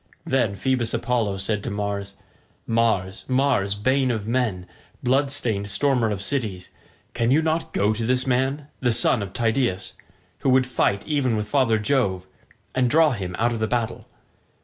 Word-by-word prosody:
Then 120 -6 +1
Phoebus 120 0 0
Apollo 115 -4 0
said 100 +1 -1
to - - -3
Mars, 100 -1 -3 0.5
"Mars, 110 -4 0
Mars, 130 -7 +1
bane 130 +5 +1
of 110 -3 -2
men, 115 -7 -1 0.4
blood 135 +3 +2
stained 110 -8 -1
stormer 125 -1 +2
of 100 -2 -3
cities, 105 -9 -3 0.4
can 115 -1 0
you 150 +5 +4
not 160 +1 -1
go 105 +2 +1
to 110 +1 -3
this 130 0 +1
man, 135 +3 0
the 125 -2 +1
son 115 +1 +3
of 100 -2 -5
Tydeus, 115 -4 0 0.5
who 135 - 0
would 130 0 +5
now 130 - -11
fight 100 -5 0
even 135 -7 0
with 105 0 -3
father 115 -3 +2
Jove, 105 -5 0 0.5
and 125 -1 +2
draw 155 +2 +5
him 95 -6 -4
out 120 +1 +1
of 115 - -3
the 110 - 0
battle? 115 -1 -2
115 Hz, 170 wpm, -23 LUFS, 100-130 Hz, 0.5 s, would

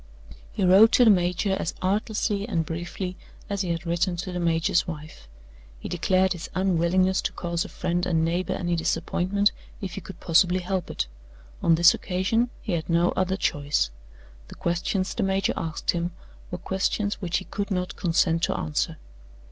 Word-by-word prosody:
He 190 - 0
wrote 200 +5 +7
to 245 - +6
the 220 - +8
major 180 +1 +1
as 165 - -3
artlessly 205 +1 0
and 165 -6 0
briefly 175 +3 -5 0.3
as 200 -1 0
he 185 - -2
had 170 +1 -2
written 175 +2 0
to 185 +2 -4
the 180 - -3
major's 165 0 +1
wife. 150 - -8 0.5
He - - -7
declared 185 +2 +2
his 175 - -7
unwillingness 185 0 +2
to - - -2
cause 170 -1 -2
a - - -8
friend 175 +1 -2
and 160 -2 +2
neighbor 175 +3 -1
any 175 -1 -1
disappointment, 180 +5 +1 0.3
if 195 -2 -5
he 195 - -5
could 185 0 -11
possibly 180 +2 +3
help 185 -1 -2
it. - - -2 0.6
On 165 - +4
this 170 +2 +7
occasion 200 +6 0
he 215 - -3
had 165 -1 -2
no 170 +1 +3
other 190 +1 0
choice. 145 - 0 0.6
The - - -11
questions 175 +2 -1
the 235 - -2
major 195 0 +1
asked 160 -2 -1
him 170 0 -2 0.4
were 180 - -4
questions 195 +3 -1
which 180 -2 0
he 185 - -5
could 200 +1 -4
not 180 -2 -2
consent 165 -1 +1
to - - -2
answer. 155 +2 -2
180 Hz, 180 wpm, -25 LUFS, 170-190 Hz, 0.6 s, the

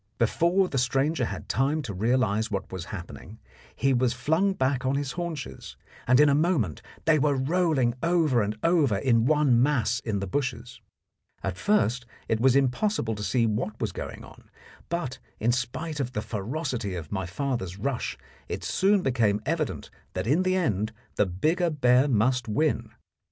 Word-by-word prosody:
Before 170 - +2
the 135 - -1
stranger 135 +3 +1
had - - -6
time 145 +4 +1
to 110 -6 -5
realize 110 +1 +1
what 100 - -4
was 95 -2 -5
happening, 95 +3 -9 0.4
he 135 0 +2
was 125 -1 +2
flung 160 +10 +1
back 130 -5 0
on 130 +1 +1
his 140 -1 -2
haunches, 170 -6 -6 0.3
and 125 +2 +5
in 150 - +7
a 140 - +4
moment 145 - +1 0.2
they 155 -1 +4
were 145 0 +2
rolling 140 -3 +1
over 165 -8 +2
and 105 +1 -2
over 155 - +3
in 115 0 +2
one 145 -6 +4
mass 125 -4 +2
in 110 -6 -2
the 100 - -3
bushes. 125 +1 -3 0.6
At 95 -2 -2
first 125 - +1 0.2
it 110 - 0
was 130 +2 +4
impossible 135 - +1
to 105 - -6
see 115 +5 +2
what 110 0 -2
was 110 -4 -1
going - - -7
on, - - -15 0.4
but, 170 -7 -3 0.2
in 115 +3 +2
spite 150 +6 -3
of 130 -2 -2
the 105 - -2
ferocity 115 - -3
of 80 -4 -7
my 95 -3 -2
father's 95 -3 -3
rush, 125 +4 -2 0.3
it - - -4
soon 195 0 +2
became 115 -6 +2
evident 155 -1 -2 0.2
that 90 +1 -3
in 145 +10 +3
the 185 0 +1
end 110 - 0 0.2
the 105 - +2
bigger 160 - +1
bear 130 -3 +3
must 125 0 +1
win. 150 +8 0
130 Hz, 170 wpm, -26 LUFS, 110-150 Hz, 0.6 s, in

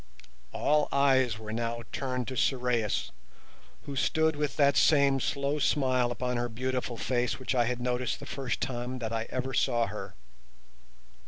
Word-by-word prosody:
All 150 0 +2
eyes 130 -4 +3
were 110 0 -7
now 115 0 -2
turned 125 -3 -2
to 130 - -5
Sorais, 125 -4 0 0.7
who 140 - -6
stood 160 +5 +2
with 150 -1 -2
that 140 -1 +4
same 140 -3 +4
slow 140 +3 -1
smile 130 -3 +2
upon 125 0 -2
her 120 0 -1
beautiful 125 0 -3
face 125 0 0
which 130 0 -2
I 120 -2 +3
had 125 +1 -2
noticed 125 0 -1
the - - -8
first 135 -4 -3
time 125 0 -3
that 115 -2 -4
I 115 0 -2
ever 130 +1 -3
saw 120 -2 +2
her. 95 -2 -7
125 Hz, 160 wpm, -29 LUFS, 120-135 Hz, 0.7 s, that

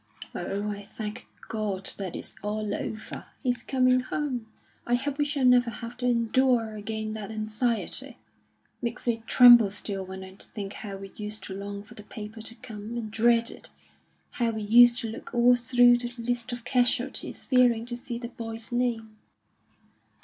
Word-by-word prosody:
"Oh, 205 +1 -3
I 205 0 -6
thank 215 +3 -7 0.2
God 205 -4 -2
that 190 -3 -4
it's - - -5
all 210 0 -2
over! 215 +1 -5 0.2
He's 245 -2 0
coming 255 -1 +3
home. 255 -3 -3 0.4
I 240 - +3
hope 280 +3 -3
we 290 - +3
shall 285 -2 0
never 250 -1 +5
have 230 +1 -7
to 250 0 -1
endure 235 -1 +2
again 215 +1 -4
that 215 -2 -6
anxiety. 220 +2 -2
It - - -15 0.6
makes 235 0 -4
me 230 -1 +1
tremble 240 -4 +8
still 195 -1 -4
when 190 0 -8
I 190 0 -11
think 200 -2 -7
how 200 -2 -6
we 195 0 -9
used 210 0 -4
to 190 - -6
long 200 +1 -6
for 205 - -15
the - - -10
paper 215 +1 -8
to 225 +1 -10
come, 225 -1 -7
and 220 -2 -4
dread 230 +1 +3
it; - - -13 0.6
how 235 -2 0
we 220 -1 -3
used 240 +3 +7
to 230 - -3
look 225 +2 -8
all 245 +1 +6
through 245 0 +5
the 240 0 -4
list 240 +1 -2
of 240 -1 -6
casualties, 250 +1 0
fearing 245 -3 +3
to 240 0 -4
see 240 0 -6
the 235 0 -6
boy's 225 -1 -7
name." 230 -3 -1
230 Hz, 180 wpm, -27 LUFS, 215-245 Hz, 0.6 s, tremble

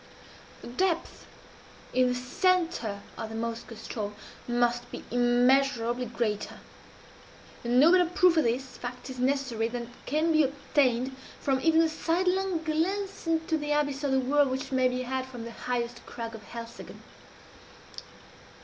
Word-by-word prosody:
The - - -7
depth 335 +7 -1 0.7
in 255 0 +4
the 250 - 0
centre 255 - 0 0.2
of 225 -1 -4
the 220 - -7
Moskoe 230 +1 -4
ström 210 -1 -5 0.3
must 240 0 +1
be - - -7
immeasurably 245 0 +3
greater; 220 -3 -2 1.1
and 240 +1 +3
no 310 +5 +7
better 360 -1 +5
proof 360 0 +4
of 320 - +4
this 255 +3 -1
fact 250 +1 -6
is 255 - -8
necessary 255 -4 +1
than 235 0 -5 0.2
can 310 +4 +2
be 310 -1 +5
obtained 265 -2 +1 0.2
from 265 -2 0
even 325 +1 +5
the 330 - +4
sidelong 360 +2 0
glance 375 +5 -1
into 320 -1 +1
the 295 0 -1
abyss 285 -1 0
of 280 - +1
the 265 - +4
whirl 280 +2 +3
which 260 +1 -3
may 260 -1 +3
be 255 0 -2
had 260 +1 -2
from 245 -3 -8
the 235 - -7
highest 240 0 -3
crag 230 -1 -6
of 225 - -8
Helseggen. 235 0 -9
260 Hz, 150 wpm, -28 LUFS, 240-315 Hz, 1.1 s, no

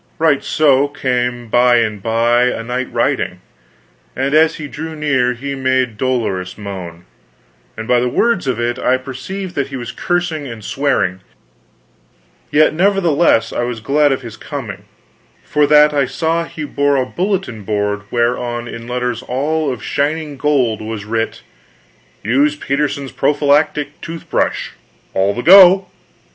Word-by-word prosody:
Right 155 -3 +2
so 145 -2 +3
came 125 -3 -2
by 120 +2 +4
and 110 -3 0
by 115 +3 +2
a 125 -2 -1
knight 125 +2 -3
riding; - - -1 0.8
and 135 +2 -1
as 160 +1 +4
he 155 - -6
drew 160 +3 -7
near 130 -5 +1
he 140 +3 -5
made 130 -3 0
dolorous 110 -8 -2
moan, 90 -4 -8 0.7
and 110 0 -6
by 125 - +3
the 125 +1 0
words 225 - +1
of 125 -3 -1
it 120 0 -1
I 130 +1 +2
perceived 140 +9 -7
that 140 -5 -1
he 135 - -8
was 120 -2 -5
cursing 175 -5 -2
and 115 -4 -9
swearing; 135 -10 0 1.3
yet 155 +1 +4
nevertheless 170 - +2
was 120 -1 -3
I - - -19
glad 145 +2 +3
of 135 -1 -2
his 115 -2 -9
coming, 110 -9 -7 0.6
for 150 -1 +1
that 150 0 +6
I 140 -3 +1
saw 165 +4 -1
he 155 - -7
bore 145 -1 +1
a 130 -2 +1
bulletin 185 - -2
board 105 0 -1
whereon 120 0 -1
in 115 0 -8
letters 125 -1 -2
all 145 +4 -1
of 125 -5 -7
shining 150 +1 -2
gold 130 -6 +1
was 110 -1 -5
writ: 115 +1 -3 0.8
"USE 140 +7 +2
PETERSON'S 140 -1 -2
PROPHYLACTIC 145 +1 +1
TOOTH 165 0 -8
BRUSH - - 0 0.4
ALL 100 +1 +1
THE 120 - -4
GO." 185 +1 +8
130 Hz, 150 wpm, -17 LUFS, 120-150 Hz, 1.3 s, GO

